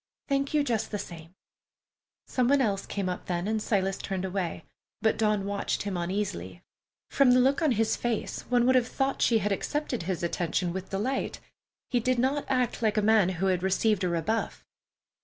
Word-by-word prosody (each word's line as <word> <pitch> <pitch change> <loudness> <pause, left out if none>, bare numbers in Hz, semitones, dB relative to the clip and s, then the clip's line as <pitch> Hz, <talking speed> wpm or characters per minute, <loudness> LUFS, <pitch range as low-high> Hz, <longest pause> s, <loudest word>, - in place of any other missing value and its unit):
Thank 275 +1 0
you 295 - +4
just 230 -6 -1
the 210 - -3
same." 170 -2 -9 0.9
Some 250 -2 0
one 280 +2 +4
else 200 -6 0
came 200 -2 -2
up 180 - -4
then, 175 +1 -1
and 220 0 0
Silas 195 -3 0
turned 190 -1 -3
away, 180 -3 -3 0.3
but 220 - +2
Dawn 210 -2 +1
watched 200 0 -2
him 200 -2 -3
uneasily. 170 - -3 0.5
From 270 -3 +5
the 250 - +5
look 270 +4 +3
on 305 -5 +3
his 225 0 +1
face, 240 -3 -2
one 245 -1 +3
would 260 - +5
have 250 -2 +3
thought 270 +1 -1
she 230 - +4
had 210 -1 -1
accepted 270 +5 -2
his 175 0 -3
attention 170 +1 -1
with 190 0 -5
delight. 225 +8 -2 0.5
He 245 - +3
did 255 +2 +1
not 270 +4 +1
act 255 -3 0
like 215 -1 +1
a - - +4
man 215 -3 +4
who 190 - 0
had 185 -2 +1
received 195 +2 +1
a 180 - +1
rebuff. 190 +7 -2
210 Hz, 195 wpm, -28 LUFS, 185-250 Hz, 0.9 s, From